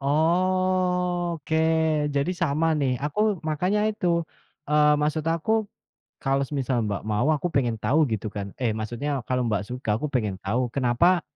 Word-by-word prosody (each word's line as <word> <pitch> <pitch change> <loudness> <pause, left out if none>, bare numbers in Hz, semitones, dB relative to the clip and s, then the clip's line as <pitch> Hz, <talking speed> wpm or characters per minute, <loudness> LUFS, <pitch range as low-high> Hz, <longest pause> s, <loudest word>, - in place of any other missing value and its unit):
Oke, 175 +1 +1 0.6
jadi 140 +5 +1
sama 165 -2 0
nih 135 -3 +1
aku 200 +4 0
makanya 180 +7 0
itu. 210 -4 -4 0.6
Eee, 150 0 +5
maksud 150 +1 0
aku 170 +7 +1 0.6
kalau 135 0 +1
semisal 130 -4 -1
Mbak 100 -1 -3
mau, 110 +6 +1
aku 155 +4 -1
pengen 120 -4 +1
tahu 155 +3 +3
gitu 110 0 -2
kan. 100 -1 -6
Eh, 120 - +2
maksudnya 120 +6 -3
kalau 125 0 0
Mbak 105 -2 0
suka, 125 -3 -2
aku 150 - -2
pengen 105 -6 0
tahu 120 +6 0
kenapa 140 +8 +2
150 Hz, 150 wpm, -25 LUFS, 125-175 Hz, 0.6 s, Eee